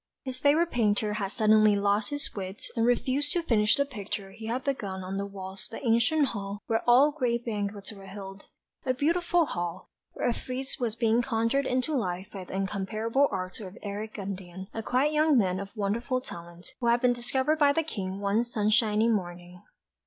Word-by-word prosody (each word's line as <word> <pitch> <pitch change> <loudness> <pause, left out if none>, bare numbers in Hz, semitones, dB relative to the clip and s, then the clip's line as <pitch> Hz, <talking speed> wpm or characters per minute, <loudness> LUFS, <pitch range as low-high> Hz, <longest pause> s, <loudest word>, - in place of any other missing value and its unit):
His 255 -1 -3
favourite 310 +5 +3
painter 210 -2 +1
had 205 -2 -1
suddenly 215 0 +5
lost 205 +1 +1
his 290 0 -3
wits 190 0 -6
and 230 0 +2
refused 265 +4 +1
to 345 - 0
finish 215 -7 +3
the 280 - +1
picture 205 -6 -5
he 220 +3 -9
had 250 +3 -2
begun 200 -9 -3
on 190 +1 -4
the 200 0 -2
walls 190 -1 -8
of - - -11
the - - -9
ancient 245 +6 +3
hall 200 -1 -5
where 225 -1 +1
all 270 +5 +7
the 310 - -19
great 235 -2 0
banquets 205 -3 -3
were 195 -1 -12
held 195 0 -8 0.4
a 255 - 0
beautiful 345 +4 +2
hall, 175 - -4 0.2
where - - -1
a 240 - +2
frieze 260 +5 -4
was 230 -3 -1
being 230 0 +3
conjured 235 +4 +1
into 255 +4 0
life 190 -5 -2
by 195 -2 -6
the 185 - -7
incomparable 215 +7 0
art 185 0 -4
of 195 -2 -9
Eric 210 +1 -5
Gundian, 190 -1 -6
a 225 - -3
quite 260 +7 +1
young 305 -2 +4
man 185 -4 +2
of 200 0 -6
wonderful 230 +6 0
talent, 170 -6 -10
who 240 - -1
had 235 +1 +4
been 250 0 +3
discovered 260 +5 0
by 290 -1 +6
the 325 +3 +1
King 195 -10 -4
one 205 +3 +2
sunshiny 215 -1 +2
morning. 180 -4 -2
220 Hz, 195 wpm, -28 LUFS, 195-255 Hz, 0.4 s, all